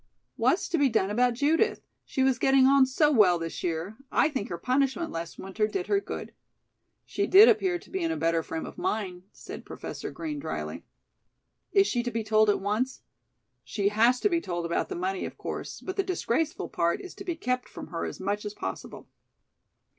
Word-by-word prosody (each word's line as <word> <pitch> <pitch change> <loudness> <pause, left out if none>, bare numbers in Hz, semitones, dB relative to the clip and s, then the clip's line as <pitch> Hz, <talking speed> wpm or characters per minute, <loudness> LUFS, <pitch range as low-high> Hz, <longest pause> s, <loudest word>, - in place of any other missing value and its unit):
"What's - - +2
to 340 -4 +1
be 280 -2 +4
done 205 -4 +1
about 245 +2 +2
Judith? 320 - +2 0.2
She 265 - 0
was 260 -2 +2
getting 270 +1 +5
on 270 0 +6
so 295 +3 +3
well 200 -9 +5
this 165 -1 -5
year. 175 +5 -3
I - - +3
think 265 -9 -4
her 175 - -4
punishment 270 - 0
last 165 0 -6
winter 200 +3 -1
did 370 - -3
her 400 - +2
good." - - -7 0.7
"She 400 - -1
did 405 +4 +9
appear 365 -2 +3
to - - -17
be 380 - -2
in 330 - 0
a 325 - -2
better 165 0 +1
frame 160 0 -5
of - - -9
mind," 185 -4 -2
said - - -9
Professor - - -7
Green 305 -3 -5
drily. - - -5 0.9
"Is 395 -1 +5
she 245 -10 0
to 245 - -3
be 225 -1 -2
told 215 0 +3
at 205 - +3
once?" 215 +7 -2 0.6
"She 200 -2 0
has 230 +4 +3
to - - +4
be 340 -3 +1
told 175 - -3
about 170 - -1
the 385 - -4
money, 375 +1 -2
of - - -6
course, - - -6
but 375 +1 -6
the 390 - +2
disgraceful 325 -5 -1
part 170 0 0
is 370 - -9
to - - -9
be 350 -3 -3
kept 250 -4 -2
from - - -9
her 165 0 -4
as - - -5
much 205 +2 -2
as 210 0 -6
possible." - - -6
250 Hz, 205 wpm, -28 LUFS, 200-325 Hz, 0.9 s, did